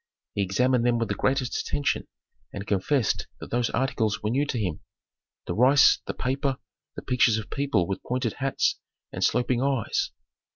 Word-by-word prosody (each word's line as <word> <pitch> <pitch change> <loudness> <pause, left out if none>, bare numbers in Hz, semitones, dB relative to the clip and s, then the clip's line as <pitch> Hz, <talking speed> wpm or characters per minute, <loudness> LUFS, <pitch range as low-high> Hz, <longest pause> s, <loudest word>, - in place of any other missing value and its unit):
He 100 - -1
examined 125 +6 +2
them 120 -1 +3
with 115 -3 -1
the - - +1
greatest 130 +2 0
attention 145 - -1 0.4
and 100 0 -6
confessed 105 +6 0
that - - -9
those 120 -1 +1
articles 115 -5 -1
were 105 - 0
new 140 +4 +1
to 130 - -2
him: 90 -8 -2 0.6
the - - -3
rice, 135 +5 +6
the - - -3
paper, 135 +1 -1 0.4
the - - -7
pictures 125 -3 +3
of 110 0 -6
people 135 -10 +1
with 95 - -3
pointed 125 -3 -2
hats 135 0 0 0.3
and - - -3
sloping 125 0 +2
eyes. 135 -5 0
125 Hz, 170 wpm, -26 LUFS, 110-135 Hz, 0.6 s, rice